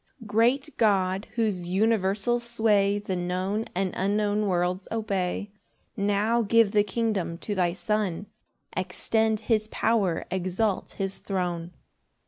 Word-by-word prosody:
1 235 - -13
Great 245 +8 +2
God, 195 -2 +2
whose 205 -7 0
universal 205 +3 +1
sway 215 -4 +2
The 200 -2 -3
known 185 +4 -1
and 190 0 0
unknown 205 +2 +1
worlds 180 0 0
obey, 200 -2 -2 0.4
Now 205 +3 +2
give 225 -1 +4
the 205 0 +4
kingdom 205 -5 -1
to 205 - -4
thy 180 -3 +1
Son, 200 0 -1 0.5
Extend 220 +4 0
his 215 -1 +1
power, 210 -6 +1
exalt 190 +3 -1
his 195 0 -2
throne. 175 -3 -3
205 Hz, 120 wpm, -26 LUFS, 185-220 Hz, 0.5 s, give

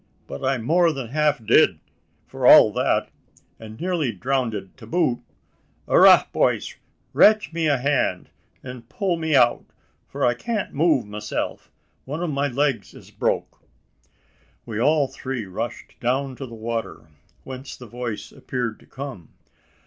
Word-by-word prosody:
But - - -8
I'm 130 -3 0
more 170 +5 +3
than 135 -6 -6
half 150 -3 0
did, - - +4 0.5
for - - -1
all - - +8
that; - - 0 0.5
an' 110 -1 -10
nearly 170 -7 -1
drownded 115 -3 -3
to 115 -4 -13
boot. 130 -4 +1 0.7
Arrah, - - +7
boys! - - 0 0.4
rache 215 -4 +4
me 165 -1 0
a 145 -2 +3
hand, 130 -9 -1 0.3
an' 125 -1 -8
pull 185 +2 -1
me 160 -2 0
out 120 -2 +4 0.4
for - - -2
I 120 - +3
can't 215 - -4
move 150 -4 +2
meself 105 0 -5 0.4
one 150 +6 -4
of 170 - -2
my 140 0 0
legs 135 -4 -1
is - - -15
broke." - - -2 1.1
We 110 -2 -5
all 150 +1 +3
three 130 -4 -5
rushed 110 +6 -6
down 130 +2 -1
to 135 - -7
the 115 - -10
water 115 -6 -5 0.4
whence 130 +1 -8
the 125 - -11
voice 120 -1 -6
appeared 120 -4 -4
to - - -21
come. 130 - -8
130 Hz, 150 wpm, -23 LUFS, 115-150 Hz, 1.1 s, all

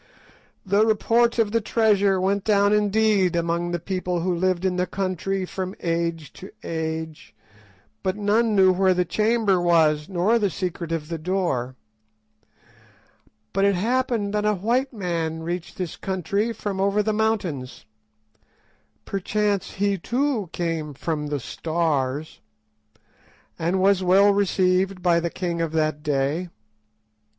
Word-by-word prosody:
The 200 +2 +3
report 230 +2 +2
of 220 -3 +2
the 230 +1 +1
treasure 205 -3 +2
went 195 +1 0
down 205 -1 +3
indeed 210 -3 +2
among 170 +1 -1
the 175 - -1
people 180 0 -3
who 180 +1 0
lived 185 +1 0
in 185 -1 +1
the 180 0 0
country 190 0 -2
from 185 +1 -5
age 165 -2 -2
to 190 - -11
age, 160 -4 -5 0.7
but 190 -1 -1
none 215 +2 +2
knew 190 -1 +5
where 185 0 +3
the 180 0 +1
chamber 215 -1 +1
was, 160 -3 +3
nor 195 +6 +2
the 205 -2 +1
secret 175 -1 -4
of 160 -2 -2
the 165 -1 -4
door. 155 -8 -1 1.8
But 195 - +1
it 200 -1 +3
happened 230 0 0
that 210 0 0
a 210 0 +2
white 240 +8 0
man 165 -6 -3
reached 175 +1 -5
this 180 -4 -4
country 195 +4 -1
from 200 -3 -4
over 200 +2 +2
the 215 +1 0
mountains—perchance 175 - -4
he 200 0 0
too 240 - -1
came 165 -4 -3
'from 150 0 -3
the 145 -1 -2
Stars'—and 155 -1 -2 1.4
was 195 0 +3
well 195 +3 +5
received 190 -1 +1
by 170 -2 +4
the 170 0 -2
king 170 -1 -3
of 165 -1 -2
that 155 -1 0
day. 150 +4 -1
185 Hz, 135 wpm, -23 LUFS, 165-205 Hz, 1.8 s, knew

